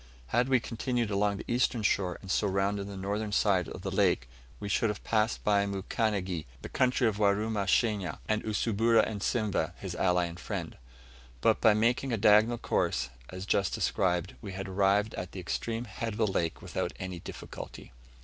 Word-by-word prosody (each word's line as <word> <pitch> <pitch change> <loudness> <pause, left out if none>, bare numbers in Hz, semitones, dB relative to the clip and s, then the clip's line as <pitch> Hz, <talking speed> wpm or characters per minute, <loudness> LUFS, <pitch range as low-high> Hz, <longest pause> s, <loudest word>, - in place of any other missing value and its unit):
Had 125 +2 +2
we 130 -1 +5
continued 115 -1 -2
along 100 0 +1
the - - -7
eastern 120 -2 +1
shore, 95 -3 +1
and 95 - -5
so 105 - +2
round 100 +1 0
the 100 0 -6
northern 105 +2 -2
side 95 -4 +2
of - - -8
the - - -3
lake, - - +2 0.3
we 105 - -5
should 105 +3 +2
have 105 - -4
passed 110 0 +1
by 100 -1 +3
Mukanigi, 95 - -2 0.2
the - - -6
country 125 -1 +2
of 105 -2 0
Warumashanya, 105 -1 +1
and 110 0 +1
Usumbura 110 +1 +2
of 105 -2 -5
Simveh, 110 -4 0
his - - -6
ally 90 -1 +2
and 85 0 -7
friend. - - -5 0.6
But - - +3
by 110 -2 +6
making 120 +4 +1
a 115 - +1
diagonal 110 +3 +5
course, - - 0 0.2
as 95 +1 -6
just 100 -2 +1
described, 90 -1 0
we 100 -2 -7
had 95 +1 -5
arrived 100 +3 +2
at 90 - -6
the 95 - -6
extreme 115 +6 -3
head 115 +1 -4
of - - -7
the 115 - +3
lake 85 -5 -1
without - - -3
any 95 -1 -5
difficulty. - - -9
105 Hz, 185 wpm, -30 LUFS, 95-110 Hz, 0.6 s, by